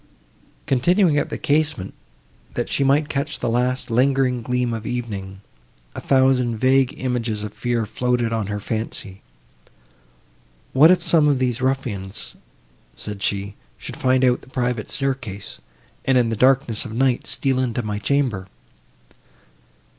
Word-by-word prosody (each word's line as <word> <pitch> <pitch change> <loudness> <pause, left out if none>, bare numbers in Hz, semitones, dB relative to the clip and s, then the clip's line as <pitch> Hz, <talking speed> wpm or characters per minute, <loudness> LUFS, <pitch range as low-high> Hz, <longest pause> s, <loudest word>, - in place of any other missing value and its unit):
Continuing 160 - +3
at - - -2
the - - -4
casement, 145 -8 0 0.6
that - - -2
she 140 - +1
might 140 +2 +3
catch 150 +1 -2
the 120 - -2
last 125 +1 0
lingering 130 0 +2
gleam 125 0 -1
of 110 -1 -5
evening, 100 -6 -5 0.5
a - - -6
thousand 130 -3 +2
vague 130 +3 +3
images 120 -4 -1
of 105 -1 -6
fear 120 -2 -1
floated 120 +1 -1
on 110 -3 -1
her 105 0 -3
fancy. 110 -2 -4 1.5
"What 150 +5 +7
if 185 - +4
some 155 -3 +4
of 145 -2 +3
these 125 -1 -1
ruffians," 115 -7 -3 0.6
said 105 -2 -7
she, 100 0 -1 0.2
"should - - -8
find 130 0 +2
out 125 -1 +2
the - - -17
private 125 -4 -2
staircase, 125 - -4 0.4
and 130 -1 +3
in 120 -2 +3
the 115 - -1
darkness 130 -1 +3
of 110 - -7
night 130 +1 +1
steal 135 -2 0
into 120 -2 -1
my 105 -1 -3
chamber!" 115 -5 0
125 Hz, 145 wpm, -22 LUFS, 110-135 Hz, 1.5 s, What